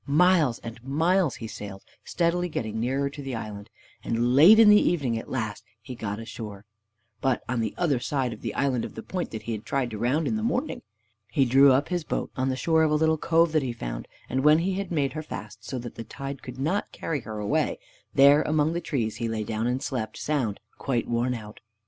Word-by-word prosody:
Miles 155 -4 +4
and 115 0 -9
miles 160 +4 +2
he 115 - -7
sailed, 100 -3 -8 0.2
steadily 175 +1 0
getting 110 -7 -3
nearer 135 +4 0
to 145 +1 -7
the 135 -3 -4
land, 105 -1 -7 0.3
and 120 +2 +1
late 165 +11 +8
in 225 -1 +8
the 210 0 +8
evening 140 -9 +1
at - - -10
last 110 -5 -3 0.2
he 120 +3 -9
got 105 -4 -4
ashore, 110 -3 -8 0.6
but 130 -2 +1
on 125 -1 -1
the 110 -2 -2
other 150 -8 +1
side 125 -1 -1
of 110 - -12
the 115 - -3 0.6
point 185 -2 -3
that 110 -1 -7
he 115 - -4
had 110 -1 -4
tried 130 -3 -1
to 105 - -5
round 135 +7 +1
in 220 - 0
the - - -2
morning. 250 +6 -1 0.5
He 135 - +3
drew 135 +3 +6
up 135 +3 +2
his 175 -2 -1
boat - - -3
on 130 0 0
the 130 - 0
shore 160 +4 +2
of 160 - +4
a 150 - +2
little 160 0 +2
cove 165 +1 +3
that 155 -1 +2
he 130 -3 -3
found, - - -6 0.2
and 130 +2 -1
when 150 +1 +7
he 180 +4 0
had 195 -1 -3
made 145 -5 0
her 155 - -4
fast, 105 -7 -8
so 130 - -5
that 120 -1 -6
the 115 - -7
tide 135 +4 -7
could 125 0 -9
not 160 +10 -1
carry 155 -3 -3
her 110 -3 -7
away, 105 -1 0 0.3
there 140 +2 +6
among 155 +1 +1
the 170 - -2
trees 115 -9 -2
he 115 0 -2
lay 110 -1 -2
down, 110 +2 -2
and 125 +2 -1
slept 110 -5 -3
sound, 130 -9 -1 0.2
quite 125 -3 -1
worn 120 +1 0
out. 105 -2 -9
130 Hz, 225 wpm, -26 LUFS, 115-155 Hz, 0.6 s, late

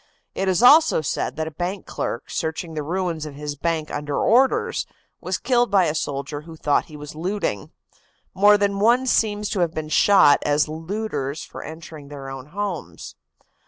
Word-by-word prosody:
It 195 - -2
is 185 +3 +2
also 300 - +7
said 145 - -2
that 160 - -2
a - - -5
bank 180 +5 -4
clerk, 115 - -4
searching 160 +1 -3
the 155 - -3
ruins 165 0 -2
of 145 - -9
his 145 0 -5
bank 160 +1 -2
under 145 0 -3
orders, 260 +4 +2 0.3
was - - -2
killed 245 -2 +1
by 195 -3 +4
a 155 - 0
soldier 145 -1 -3
who 165 +1 -11
thought 150 -2 +1
he 150 - -12
was 150 0 -9
looting. 165 - -3 0.6
More 205 +2 +6
than 200 -1 0
one 240 +5 +4
seems 210 -4 +1
to 200 - -2
have 170 -2 0
been 155 -1 -4
shot 155 -5 +5
as 145 0 +2
looters 160 -3 -4
for - - -9
entering 160 -2 -10
their 140 -2 -8
own 135 0 -8
homes. 195 0 -5
160 Hz, 180 wpm, -22 LUFS, 150-200 Hz, 0.6 s, also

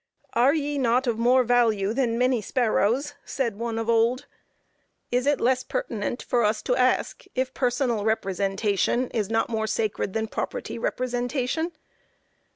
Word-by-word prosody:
"Are 255 +6 +4
ye 290 -2 -1
not 250 +1 +2
of 230 -2 -1
more 250 +2 +4
value 225 -4 +2
than 235 -2 0
many 250 -1 +2
sparrows?" 245 +4 +1
said 235 -7 -3
one 230 -1 -2
of 225 0 -2
old. 235 +3 +2 0.9
Is 250 +2 +1
it 290 -1 +3
less 255 +1 +2
pertinent 245 - -3
for 240 -1 +1
us 215 +1 +1
to 250 - +1
ask 255 0 +1
if 260 0 -1
personal 245 -3 0
representation 200 +3 0
is 215 -4 -1
not 225 0 +1
more 220 -1 -2
sacred 215 -2 -1
than 220 0 0
property - - -4
representation? 255 - -1
240 Hz, 150 wpm, -25 LUFS, 220-255 Hz, 0.9 s, Are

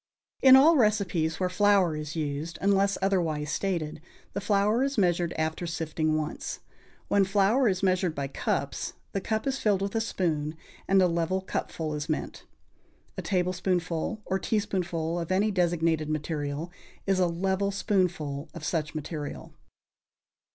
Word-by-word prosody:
= - - -44
In 260 - +11
all 305 +5 +7
recipes 195 - +1
where 185 - +1
flour 185 -2 +3
is 150 +1 -5
used, 155 +1 -3
unless 200 0 +2
otherwise 160 -6 0
stated, 155 -3 -2 0.3
the 200 - -3
flour 205 +3 +2
is 275 0 0
measured 175 -3 +2
after 160 +2 -1
sifting 155 -2 -1
once. 155 0 -4 0.5
When 200 - +4
flour 205 +6 +3
is 190 -2 0
measured 185 -3 +2
by 140 -1 -2
cups, 135 - -2 0.2
the 195 - -2
cup 220 +2 -2
is 270 0 -1
filled 200 -3 +2
with 200 - -3
a 225 - +1
spoon, 160 -8 -1 0.3
and 195 0 +4
a - - +5
level 170 +2 0
cupful 160 -4 -4
is 150 +2 -4
meant. 155 - -4 0.7
A - - -4
tablespoonful 180 +1 -1
or 190 - -1
teaspoonful 175 -6 -1
of 170 +1 -4
any 200 +3 +2
designated 165 -4 +1
material 155 +1 -3 0.3
is 195 -1 +2
a 180 - +4
level 190 +3 0
spoonful 175 -8 -1
of - - -8
such 160 -3 -2
material. 150 -1 -6
180 Hz, 150 wpm, -28 LUFS, 160-200 Hz, 0.7 s, In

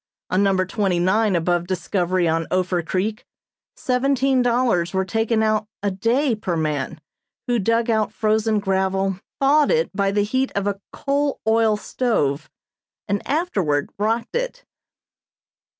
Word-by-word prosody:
On 185 +2 +2
number 190 -2 +2
twenty 190 -2 0
nine 190 +3 +2
above 175 +1 0
Discovery 180 -1 0
on 165 0 0
Ophir 185 -1 0
Creek, 190 +6 -2 0.5
seventeen 270 -1 +1
dollars 235 -8 +1
were 190 0 +1
taken 225 +2 0
out 215 -1 +1 0.2
a 205 - +1
day 235 +8 +1
per 190 -6 -2
man, 155 -1 -2 0.5
who 240 -1 +1
dug 230 +3 +1
out 220 -3 +1
frozen 220 0 +1
gravel, 190 -1 0 0.2
thawed 290 +2 +4
it 485 - +1
by 200 0 +1
the 205 +1 +1
heat 260 +6 0
of 200 0 0
a 200 -1 -2
coal 285 0 -1
oil 220 -1 +3
stove, 155 - -1 0.6
and 200 0 0
afterward 195 - 0
rocked 225 - -1
it. - - -3
210 Hz, 140 wpm, -22 LUFS, 185-235 Hz, 0.6 s, thawed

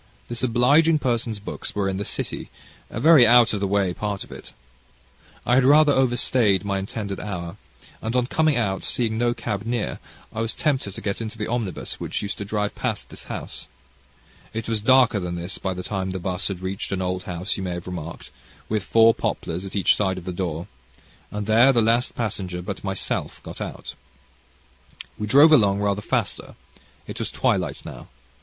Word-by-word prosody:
This 120 -1 -4
obliging 140 +7 +4
person's 120 -5 -1
books 100 - -7
were 100 -1 0
in 95 -1 -1
the 100 - -2
City, - - -3 0.4
a - - -5
very 145 -3 +7
out 120 -1 +6
of 105 - -1
the 100 - 0
way 100 -2 +1
part 100 +1 -3
of - - -16
it. - - -10 0.9
I 125 - +2
had 130 +1 +5
rather 145 +2 +6
out 130 -2 +2
stayed 105 -6 +2
my 100 -1 0
intended 100 0 -4
hour, 90 -2 -5 0.4
and, 115 +2 -3
on 125 -1 +3
coming 155 +2 +2
out, 95 -5 0
seeing 115 -3 -1
no 120 0 +1
cab 100 -2 -3
near, 115 -1 -2 0.3
I 110 - -2
was 115 0 -2
tempted 130 -10 -1
to - - -7
get 100 +2 -2
into 115 0 -5
the 105 - -2
omnibus 110 -6 -3
which - - -3
used 100 - -4
to 100 - -4
drive 105 0 -1
past - - -3
this - - -9
house. - - -6 0.9
It 115 0 -4
was 110 -2 -1
darker 125 -2 +5
than 90 -2 -4
this 85 +2 -4
by 95 -1 -2
the 90 - -5
time 95 -1 -3
the 95 0 -3
'bus 90 +1 -2
had 95 -3 -4
reached 95 +1 -4
an 95 -1 -1
old 90 0 -2
house, 90 +3 -3
you - - -5
may 90 -2 -3
have 90 0 -6
remarked, 85 -2 -7 0.4
with 110 -1 0
four 115 +3 +5
poplars 85 -2 -3
at 95 - -8
each 100 - +4
side 95 -2 0
of 90 - -8
the 90 - -4
door, 85 -2 -3 0.6
and 105 0 -4
there 115 +5 +6
the 120 - +3
last 115 +2 +2
passenger 95 -6 -3
but 95 +1 -6
myself 95 -1 -2
got - - -9
out. - - -6 1.3
We 105 - -2
drove 145 +7 +7
along 105 -9 +5
rather 100 0 0
faster. - - -2 0.5
It - - -7
was - - -2
twilight - - -1
now. - - -9
105 Hz, 200 wpm, -24 LUFS, 95-120 Hz, 1.3 s, very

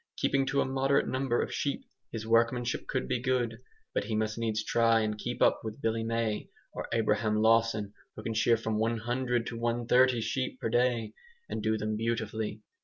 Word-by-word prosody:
Keeping 135 -1 +1
to 140 - +2
a - - +1
moderate 135 +1 +1
number 130 -2 0
of - - -5
sheep, 140 - -2 0.3
his 110 -1 -5
workmanship 115 +2 +1
could 65 - -2
be 120 - 0
good. 120 -3 0 0.3
But - - 0
he 110 +1 -2
must 110 0 0
needs 110 -2 -1
try 115 0 +3
and 105 -1 -1
keep 120 +3 -2
up - - +4
with 110 +1 -6
Billy 115 -2 0
May 115 -1 -1 0.2
or - - -5
Abraham 110 -1 +1
Lawson, 110 -2 +3 0.2
who 110 - -8
can 115 - -2
shear 115 +1 +3
from 110 -1 -2
100 120 +2 0
to 115 0 -5
130 120 +1 +3
sheep 130 +2 -2
per - - -2
day, 120 -2 +1 0.3
and - - -4
do 110 0 +1
them 110 0 -2
beautifully. 110 -1 -2
115 Hz, 185 wpm, -30 LUFS, 110-120 Hz, 0.3 s, up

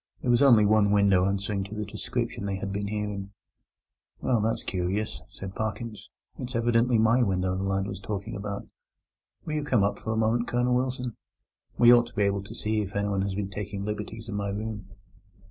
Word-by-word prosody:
There 125 - +2
was 120 - +4
only 120 -7 +7
one 105 0 +4
window 100 -3 +4
answering 100 0 -1
to 100 +2 -8
the 105 0 -3
description 100 0 -3
they 100 - -1
had 95 0 -4
been 100 0 -2
hearing. 100 -1 -4 0.9
"Well, 120 -4 +1
that's 110 +2 0
curious," 95 +4 -2
said 95 -1 -8
Parkins; 110 +1 -4 0.3
"it's 125 0 -5
evidently 115 +1 +3
my 110 +3 +4
window 95 -4 +1
the 95 - -2
lad 95 0 0
was 100 - -5
talking 100 0 -4
about. 100 0 -5 0.8
Will 155 - -3
you 150 -1 -1
come 125 -8 +2
up 100 - 0
for 110 - -3
a 110 - -1
moment, 115 +2 +2
Colonel 125 +1 +1
Wilson? 125 -1 -1 0.6
We 120 0 +8
ought 120 -1 +5
to - - -16
be 105 - +2
able 100 0 +1
to - - -9
see 110 0 0
if 100 0 -6
anyone 100 -1 0
has 95 0 -1
been 100 -1 -3
taking 100 0 -4
liberties 105 +2 -5
in 115 - -5
my 100 -1 -2
room." 105 -1 -5
105 Hz, 200 wpm, -27 LUFS, 100-115 Hz, 0.9 s, We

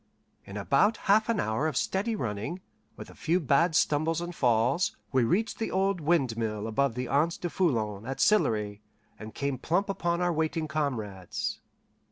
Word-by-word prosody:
In 100 - -8
about 140 - +2
half 215 +3 +4
an 230 - +1
hour 110 +8 0
of 150 -5 -2
steady 215 +4 0
running, 115 - -3 0.4
with - - -9
a - - -14
few 170 +3 0
bad 160 +2 +2
stumbles 155 +3 +2
and 175 +1 -5
falls, 125 +5 +1
we 130 -3 +3
reached 205 - 0
the 225 - -1
old 190 -1 0
windmill 115 -9 0
above 115 +2 0
the 125 0 -3
Anse 150 +6 +1
du 175 - -3
Foulon 110 - 0
at 135 - -4
Sillery, 105 - +2 0.4
and 110 0 -9
came 140 -2 -2
plump 190 +8 0
upon 175 -3 -1
our 175 -1 +1
waiting 160 0 -1
comrades. 115 - -3
145 Hz, 170 wpm, -28 LUFS, 115-175 Hz, 0.4 s, half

